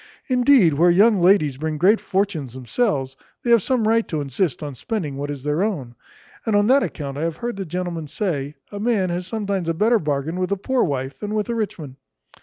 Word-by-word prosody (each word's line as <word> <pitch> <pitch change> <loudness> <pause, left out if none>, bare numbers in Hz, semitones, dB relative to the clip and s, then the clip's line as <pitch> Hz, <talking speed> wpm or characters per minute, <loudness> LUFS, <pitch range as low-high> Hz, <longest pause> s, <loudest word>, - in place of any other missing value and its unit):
Indeed, 250 - +5
where 170 +5 +4
young 205 +4 +5
ladies 175 -7 +4
bring 155 +1 -3
great 195 +8 +4
fortunes 185 - -1
themselves, 135 - -1 0.3
they 240 - +1
have 235 -2 +6
some 235 0 0
right 230 0 +2
to 155 - -2
insist 145 +3 -2
on 145 -1 -5
spending 155 - -4
what 145 +1 -4
is 140 -3 -6
their 150 +3 0
own; 160 - -2 0.5
and 220 -3 0
on 205 0 +4
that 265 +5 +5
account 140 - -4
I - - -3
have 165 -1 -2
heard 240 -1 -4
the 195 -1 -5
gentlemen 170 -2 -4
say, 145 -5 -3 0.2
a 205 - -6
man 205 -5 +1
has 175 +1 -3
sometimes 200 -5 -2
a 165 - 0
better 225 +6 +3
bargain 150 +2 -2
with 185 +1 -1
a 200 - +1
poor 255 +6 0
wife, 135 -2 -3
than 210 0 -4
with 210 +1 -1
a - - 0
rich 220 -3 -2
one. 140 -5 -9
180 Hz, 220 wpm, -22 LUFS, 145-215 Hz, 0.5 s, have